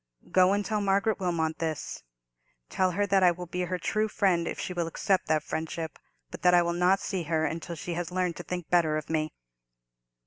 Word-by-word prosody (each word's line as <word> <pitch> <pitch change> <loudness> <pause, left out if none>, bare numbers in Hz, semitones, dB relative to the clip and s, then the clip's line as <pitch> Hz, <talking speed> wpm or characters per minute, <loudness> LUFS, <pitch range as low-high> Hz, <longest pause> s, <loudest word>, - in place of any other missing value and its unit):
Go 185 0 +5
and 205 0 0
tell 215 -2 0
Margaret 200 +2 +1
Wilmot 165 -4 -1
this: 160 -3 -3 0.7
tell 185 -1 +2
her 205 +2 +1
that 195 -1 +3
I 180 - +7
will 175 +1 -3
be 180 +1 -3
her 180 +1 -2
true 215 +4 0
friend 185 -5 +1
if - - -4
she 180 - -3
will 170 -2 -1
accept 190 +3 0
that 155 -1 +2
friendship, 160 0 -4 0.3
but - - -8
that 180 0 +5
I 175 - +5
will 170 0 0
not 180 +3 +3
see 190 -3 -3
her 160 0 +1
until 165 +2 -4
she 170 +3 -5
has 175 0 -3
learned 180 -2 0
to 175 - -6
think 180 -2 -5
better 165 -3 +3
of 155 +1 -5
me." 155 -1 0
175 Hz, 215 wpm, -28 LUFS, 165-190 Hz, 0.7 s, I